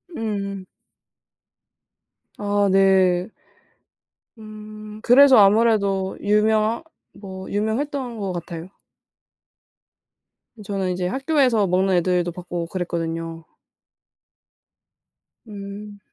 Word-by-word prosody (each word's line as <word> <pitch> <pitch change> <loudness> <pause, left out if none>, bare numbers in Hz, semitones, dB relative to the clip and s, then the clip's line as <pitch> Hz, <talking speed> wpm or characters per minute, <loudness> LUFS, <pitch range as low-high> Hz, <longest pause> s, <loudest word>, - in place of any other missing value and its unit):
음. 200 -4 -4 1.7
아. 205 -1 +1
네. 190 -1 +3 1.1
음. 215 0 -11
그래서 265 +2 +7
아무래도 200 -2 +3
유명하 215 +4 +2 0.3
뭐 190 -2 -9
유명했던 235 +4 -2
것 195 -2 -3
같아요. 170 0 -7 2.0
저는 195 -2 -2
인제 180 0 -3
학교에서 265 - +1
먹는 185 +2 +1
애들도 175 0 0
봤고 175 -1 -5
그랬거든요. 165 -2 -4 2.0
음. 205 0 -9
200 Hz, 165 characters per minute, -22 LUFS, 185-215 Hz, 2.0 s, 그래서